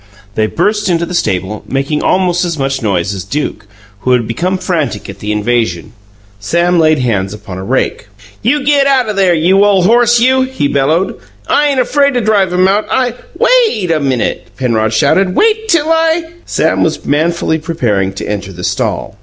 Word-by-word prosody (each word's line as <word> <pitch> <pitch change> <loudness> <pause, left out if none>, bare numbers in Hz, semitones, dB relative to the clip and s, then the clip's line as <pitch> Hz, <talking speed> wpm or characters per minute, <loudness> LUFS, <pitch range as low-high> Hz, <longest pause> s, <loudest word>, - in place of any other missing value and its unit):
They 110 +1 0
burst 210 - 0
into 170 -1 +1
the 180 - -7
stable, 105 - -2
making 140 +3 -1
almost 180 -1 +1
as 170 -3 -2
much 135 -1 -2
noise 100 -3 -1
as 95 -2 -5
Duke, 105 0 -4 0.3
who 125 +5 +1
had 120 -3 +1
become 180 +11 -1
frantic 145 - -2
at - - -14
the 105 - -4
invasion. 105 -3 -1 0.5
Sam 170 +10 +1
laid 155 -1 +3
hands 105 -6 -1
upon 95 -3 -9
a - - -6
rake. 115 -1 -2 0.3
"You 275 +6 +1
get 280 -1 +3
out 265 -4 +2
o' - - -1
there, 190 -3 +2
you 185 +5 +3
ole 200 -3 +3
horse, 240 +3 +4
you!" 260 +2 +3
he 260 - -1
bellowed. 150 +7 0 0.3
"I 295 - +2
ain't 275 -2 0
afraid 280 +2 +2
to 245 - +1
drive 205 -4 +2
him 180 +1 +3
out. 205 +2 +1
I 255 -3 0
" - - -19
"WAIT 445 - +2
a 160 - +1
minute!" 135 -5 -2
Penrod 115 -4 0
shouted. 185 - +2
"Wait 440 0 +2
till 330 -6 +2
I 325 0 +1
" 345 - -26
Sam - - 0
was - - -1
manfully 160 +2 0
preparing 120 - -1
to 100 - -6
enter 100 -1 -4
the 90 -1 -9
stall. - - -2
170 Hz, 195 wpm, -13 LUFS, -, 0.5 s, horse